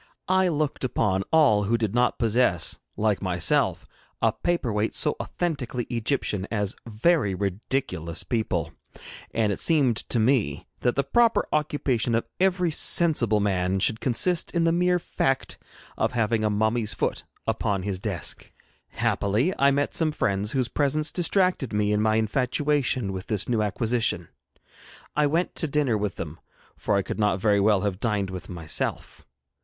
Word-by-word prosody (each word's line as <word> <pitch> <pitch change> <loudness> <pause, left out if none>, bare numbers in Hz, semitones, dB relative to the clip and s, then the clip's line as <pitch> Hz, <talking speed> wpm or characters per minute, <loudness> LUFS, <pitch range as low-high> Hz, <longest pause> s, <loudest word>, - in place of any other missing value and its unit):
I 190 0 +3
looked 155 -5 -1
upon 95 -6 0
all 135 -11 +4
who 115 +4 +1
did 110 -3 -2
not 125 +1 +2
possess, 115 -6 +1 0.2
like 105 -2 +1
myself, 90 -3 0 0.3
a 115 -1 +2
paper 155 -4 -1
weight 105 +1 -1
so - - +1
authentically 140 -8 -3
Egyptian 115 -5 -1
as 105 -3 -1
very 115 - +2
ridiculous 95 -3 -2
people, 110 - -2 0.6
and 110 -2 0
it - - -6
seemed 140 -9 +3
to - - +1
me 115 0 +1
that 125 - 0
the 140 - +1
proper 230 - +3
occupation 135 -6 0
of 115 - 0
every 180 -2 +2
sensible 145 -10 +3
man 95 -2 0
should 110 +4 +1
consist 165 +8 +2
in 170 - +1
the 165 - +3
mere 180 +1 +2
fact 135 -5 -2 0.4
of - - 0
having 115 -2 +1
a 105 - +2
mummy's 110 0 0
foot - - -2 0.2
upon 100 -2 -1
his 95 -2 -3
desk. 95 -6 -4 0.4
Happily 110 - 0
I 140 - +5
met 140 +1 0
some 160 -2 +1
friends, 100 -6 -1
whose 130 -3 0
presence 150 +3 0
distracted 180 - +1
me 105 0 +1
in 105 - +1
my 110 0 +2
infatuation 125 0 0
with 95 +2 -6
this 105 -4 -1
new 115 -3 +1
acquisition. 115 +3 -1 0.9
I 150 -1 +3
went 165 +5 0
to 160 - +2
dinner 140 -5 +1
with 105 -3 -2
them, 80 +1 -7 0.4
for 105 - -1
I 100 - +1
could - - -5
not 105 -3 +1
very 100 +1 +3
well 100 -1 +3
have 100 -2 -2
dined 105 -5 -1
with 90 -1 -7
myself. 85 -7 -4
115 Hz, 160 wpm, -25 LUFS, 105-145 Hz, 0.9 s, I